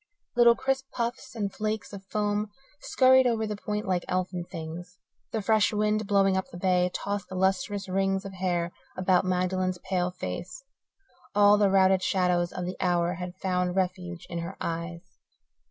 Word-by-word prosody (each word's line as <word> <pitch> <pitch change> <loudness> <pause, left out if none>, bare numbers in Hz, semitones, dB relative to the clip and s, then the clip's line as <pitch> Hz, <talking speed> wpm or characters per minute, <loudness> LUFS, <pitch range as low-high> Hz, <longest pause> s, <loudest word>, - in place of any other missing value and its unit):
Little 235 -1 +6
crisp 270 +1 -1
puffs 235 0 -3
and 200 -3 -2
flakes 215 0 -3
of 195 -1 -8
foam 210 +1 -1 0.3
scurried 260 -2 +5
over 225 -2 +1
the 210 -1 -3
point 210 +1 -4
like 180 -2 0
elfin 180 -1 -1
things. 170 +2 -8 0.3
The 220 -2 -2
fresh 220 0 +3
wind, 210 0 0
blowing 195 -1 +3
up 190 - -2
the - - -9
bay, 180 0 +2
tossed 200 +1 -3
the 190 - -6
lustrous 195 +2 0
rings 195 +1 0
of 195 - -7
hair 175 -2 -1 0.3
about 185 0 +3
Magdalen's 185 0 0
pale 180 0 -1
face; 180 - -6 0.7
all 205 0 +6
the 205 -1 +4
routed 190 -1 +4
shadows 180 -2 +1
of 180 - -4
the 180 - -5
hour 175 -1 +2
had 180 0 -6
found 180 -1 -1
refuge 180 -2 -2
in 170 - -4
her 170 +3 -6
eyes. 170 +1 -5
190 Hz, 170 wpm, -27 LUFS, 180-205 Hz, 0.7 s, Little